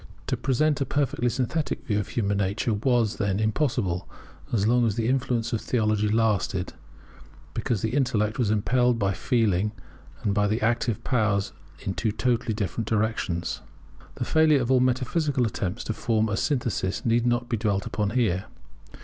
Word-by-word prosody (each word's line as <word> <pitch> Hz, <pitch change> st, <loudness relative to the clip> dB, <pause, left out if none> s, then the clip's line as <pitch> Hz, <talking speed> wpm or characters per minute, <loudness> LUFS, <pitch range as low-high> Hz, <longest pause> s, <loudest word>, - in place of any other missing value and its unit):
To -, -, 0 dB
present 145 Hz, +2 st, +1 dB
a -, -, +2 dB
perfectly 140 Hz, -3 st, 0 dB
synthetic 130 Hz, +6 st, -2 dB
view 105 Hz, -3 st, 0 dB
of 105 Hz, -, -3 dB
human 100 Hz, -3 st, -1 dB
nature 100 Hz, +4 st, 0 dB
was, 115 Hz, 0 st, +1 dB
then, 100 Hz, -2 st, 0 dB
impossible 110 Hz, -, 0 dB, 0.4 s
as 105 Hz, -4 st, +1 dB
long 120 Hz, +1 st, +3 dB
as 105 Hz, -, -1 dB
the 115 Hz, -1 st, 0 dB
influence 125 Hz, -2 st, 0 dB
of 110 Hz, -, 0 dB
theology 110 Hz, -3 st, +1 dB
lasted; 105 Hz, -4 st, 0 dB, 0.8 s
because 115 Hz, -6 st, -1 dB
the 110 Hz, -, 0 dB
Intellect 115 Hz, -6 st, +1 dB
was 115 Hz, -5 st, +2 dB
impelled 120 Hz, +3 st, +2 dB
by 100 Hz, -3 st, +1 dB
Feeling 105 Hz, -2 st, +1 dB, 0.5 s
and 100 Hz, -3 st, +1 dB
by 105 Hz, 0 st, +2 dB
the 110 Hz, +2 st, 0 dB
Active 115 Hz, -1 st, 0 dB
powers 105 Hz, -, +1 dB, 0.3 s
in 95 Hz, -, -3 dB
two 110 Hz, +2 st, -1 dB
totally 115 Hz, 0 st, 0 dB
different 110 Hz, +2 st, -3 dB
directions. 105 Hz, -7 st, -1 dB, 0.5 s
The 120 Hz, -, -3 dB
failure 155 Hz, -2 st, +4 dB
of 120 Hz, +1 st, 0 dB
all 130 Hz, -, +5 dB
metaphysical 130 Hz, +2 st, +1 dB
attempts 95 Hz, -4 st, -3 dB
to 110 Hz, -, -2 dB
form 110 Hz, 0 st, 0 dB
a 105 Hz, -, 0 dB
synthesis 120 Hz, -8 st, -1 dB
need 120 Hz, +1 st, +2 dB
not 120 Hz, 0 st, +1 dB
be 120 Hz, -, 0 dB
dwelt 100 Hz, -2 st, 0 dB
upon 105 Hz, -2 st, -1 dB
here. 105 Hz, -5 st, +1 dB
115 Hz, 165 wpm, -26 LUFS, 105-125 Hz, 0.8 s, all